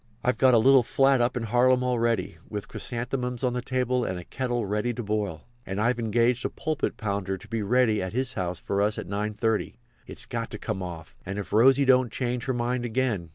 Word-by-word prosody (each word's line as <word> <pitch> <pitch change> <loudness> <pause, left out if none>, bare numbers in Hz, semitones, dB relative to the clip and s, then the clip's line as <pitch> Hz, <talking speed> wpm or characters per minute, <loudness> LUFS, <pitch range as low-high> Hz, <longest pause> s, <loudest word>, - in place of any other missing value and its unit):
"I've 125 - +1
got 130 -2 +6
a - - +7
little 135 +4 +6
flat 135 +2 +3
up 125 +1 +1
in 120 - -2
Harlem 125 +3 +3
all 125 -1 0
ready, 115 0 0
with 105 -2 -5
chrysanthemums 125 0 -3
on 125 -1 +1
the 125 - -2
table 125 -1 0
and 95 - -2
a 90 - -7
kettle 120 +1 -2
ready 105 +4 -1
to 120 - -4
boil. 105 -5 -3 0.2
And 95 -1 -4
I've 120 +2 +1
engaged 115 +2 +1
a - - 0
pulpit 155 -2 -2
pounder 100 -2 -2
to 110 - -14
be 115 0 -2
ready 110 0 +2
at 95 0 -3
his 125 +1 -1
house 90 -1 -3
for 100 0 -1
us 105 +1 +1
at - - -4
9.30. 105 +2 -1 0.3
It's - - -7
got - - -4
to - - -6
come 95 - -4
off. 85 -3 -7
And 95 +2 -5
if 100 - -6
Rosy 135 +5 +5
don't 130 -2 +4
change 125 -1 -2
her 130 - 0
mind 120 +1 -1
again!" 115 -7 -1
120 Hz, 225 wpm, -26 LUFS, 105-125 Hz, 0.3 s, a